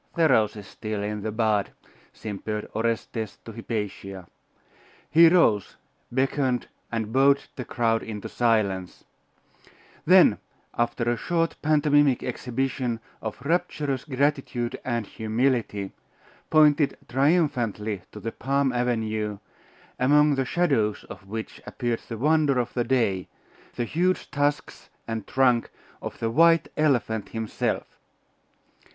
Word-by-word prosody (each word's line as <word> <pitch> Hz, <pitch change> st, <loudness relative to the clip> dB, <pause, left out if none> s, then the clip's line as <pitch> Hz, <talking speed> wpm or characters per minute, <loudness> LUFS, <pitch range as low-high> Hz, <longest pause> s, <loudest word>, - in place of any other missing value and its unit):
'The 165 Hz, -2 st, +4 dB
rose 110 Hz, -1 st, +3 dB
is 105 Hz, -2 st, -9 dB
still 110 Hz, 0 st, -5 dB
in 105 Hz, 0 st, -3 dB
the 110 Hz, +1 st, -3 dB
bud,' 110 Hz, -2 st, +1 dB, 0.4 s
simpered 105 Hz, 0 st, -5 dB
Orestes 115 Hz, -1 st, -2 dB
to 115 Hz, -, -7 dB
Hypatia. 105 Hz, -4 st, -5 dB, 0.9 s
He 165 Hz, +1 st, +8 dB
rose, 115 Hz, -, +3 dB, 0.4 s
beckoned 130 Hz, 0 st, 0 dB, 0.3 s
and 110 Hz, -1 st, -3 dB
bowed 140 Hz, +1 st, +4 dB
the 125 Hz, -, -4 dB
crowd 115 Hz, -1 st, +1 dB
into 105 Hz, -2 st, -6 dB
silence; 105 Hz, -6 st, 0 dB
and -, -, -32 dB, 0.3 s
then, -, -, +7 dB, 0.4 s
after 120 Hz, 0 st, 0 dB
a 120 Hz, -, +2 dB
short 165 Hz, +3 st, 0 dB
pantomimic 145 Hz, -3 st, +3 dB
exhibition 125 Hz, -1 st, -2 dB, 0.2 s
of 110 Hz, +2 st, -6 dB
rapturous 150 Hz, -5 st, -1 dB
gratitude 135 Hz, -4 st, -1 dB
and 120 Hz, -3 st, -1 dB
humility, 110 Hz, -3 st, -1 dB, 0.6 s
pointed 150 Hz, -2 st, +4 dB
triumphantly 120 Hz, -, +1 dB
to 105 Hz, -, -9 dB
the 115 Hz, +2 st, -4 dB
palm 135 Hz, +1 st, 0 dB
avenue, 110 Hz, -4 st, -1 dB, 0.6 s
among 150 Hz, +3 st, +5 dB
the 135 Hz, -1 st, 0 dB
shadows 125 Hz, -, +1 dB
of 95 Hz, -, -11 dB
which 110 Hz, +2 st, -6 dB
appeared 120 Hz, -1 st, -2 dB
the 115 Hz, -, -4 dB
wonder 150 Hz, +1 st, +3 dB
of 120 Hz, -1 st, -1 dB
the 120 Hz, -, 0 dB
day 115 Hz, -7 st, 0 dB, 0.5 s
the 120 Hz, -, -1 dB
huge 180 Hz, +8 st, 0 dB
tusks 145 Hz, 0 st, -2 dB, 0.2 s
and 115 Hz, -2 st, -4 dB
trunk 125 Hz, -3 st, +2 dB, 0.3 s
of -, -, -6 dB
the 115 Hz, 0 st, -2 dB
white 165 Hz, +4 st, +4 dB
elephant 120 Hz, -8 st, +1 dB
himself. 110 Hz, -1 st, -3 dB
120 Hz, 120 wpm, -25 LUFS, 110-140 Hz, 0.9 s, He